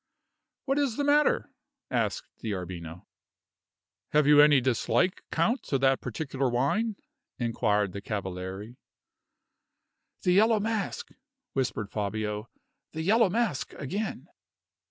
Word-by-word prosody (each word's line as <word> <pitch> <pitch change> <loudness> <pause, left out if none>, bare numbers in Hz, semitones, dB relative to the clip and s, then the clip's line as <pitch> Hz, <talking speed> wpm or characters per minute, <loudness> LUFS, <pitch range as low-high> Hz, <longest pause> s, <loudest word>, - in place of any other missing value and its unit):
"What 275 +1 +1
is 270 -6 0
the 290 - 0
matter?" 290 +1 +3 0.4
asked - - -1
D'Arbino. 90 -5 -5 1.1
"Have 150 -1 +5
you 145 0 +8
any 150 -2 +7
dislike, 125 - +1
count, 175 +11 +1
to 135 - 0
that 135 0 +2
particular 135 +1 -2
wine?" 200 - +1 0.4
inquired 105 -4 +1
the 100 - -6
cavaliere. 95 +3 -5 1.5
"The 180 - +3
Yellow 215 +4 +5
Mask!" 215 -1 -2 0.4
whispered 115 -6 -2
Fabio. 105 +1 -3 0.4
"The 160 0 -3
Yellow 215 +3 +4
Mask 220 - -1
again!" 195 +10 -4
135 Hz, 110 wpm, -28 LUFS, -, 1.5 s, you